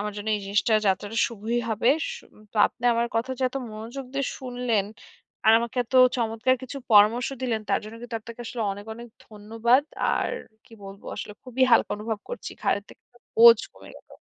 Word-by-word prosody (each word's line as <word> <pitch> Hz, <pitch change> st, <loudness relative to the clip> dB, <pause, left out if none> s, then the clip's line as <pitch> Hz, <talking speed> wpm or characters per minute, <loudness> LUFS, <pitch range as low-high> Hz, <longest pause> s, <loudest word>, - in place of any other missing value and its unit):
আমার 210 Hz, 0 st, -3 dB
জন্য 205 Hz, +1 st, -5 dB
এই -, -, -6 dB
জিনিসটা 205 Hz, +3 st, +1 dB, 0.2 s
যাত্রাটা 205 Hz, +4 st, -1 dB
শুভই 230 Hz, +1 st, -3 dB
হবে। 220 Hz, +2 st, +1 dB, 0.3 s
সু 480 Hz, -, -12 dB, 0.3 s
তো -, -, -11 dB
আপনি 245 Hz, -, -16 dB
আমার 235 Hz, +1 st, +1 dB
কথা 235 Hz, +3 st, -1 dB
যে -, -, -3 dB
এত 255 Hz, -, -7 dB, 0.2 s
মনোযোগ 230 Hz, +5 st, -7 dB
দিয়ে 275 Hz, 0 st, 0 dB
শুনলেন 245 Hz, -5 st, -1 dB, 0.6 s
আর -, -, +8 dB
আমাকে 235 Hz, +2 st, -5 dB
এত 240 Hz, -, -12 dB, 0.2 s
চমৎকার 230 Hz, +2 st, +1 dB
কিছু 260 Hz, +2 st, -7 dB, 0.2 s
পরামর্শ 215 Hz, +4 st, +5 dB
দিলেন 235 Hz, -4 st, -1 dB
তার -, -, +2 dB
জন্য 215 Hz, +1 st, -9 dB
কিন্তু 240 Hz, -1 st, -5 dB
আপনাকে 235 Hz, +2 st, -11 dB
আসলে 230 Hz, 0 st, -4 dB
অনেক, 205 Hz, +1 st, -9 dB
অনেক 235 Hz, +1 st, -10 dB, 0.2 s
ধন্যবাদ। 225 Hz, +5 st, +1 dB, 0.3 s
আর -, -, -1 dB, 0.3 s
কী -, -, -22 dB
বলবো, 195 Hz, +1 st, -11 dB
আসলে 210 Hz, -, -6 dB
খুবই 255 Hz, 0 st, -2 dB
হালকা 230 Hz, -, +4 dB
অনুভব 215 Hz, +1 st, -4 dB
করছি, -, -, -6 dB
ঘাড়ে 205 Hz, -, +1 dB
থেকে -, -, -17 dB, 0.3 s
বোঝা 230 Hz, 0 st, +9 dB
কমে -, -, -15 dB
গেল। -, -, -18 dB
230 Hz, 190 wpm, -25 LUFS, 215-245 Hz, 0.6 s, বোঝা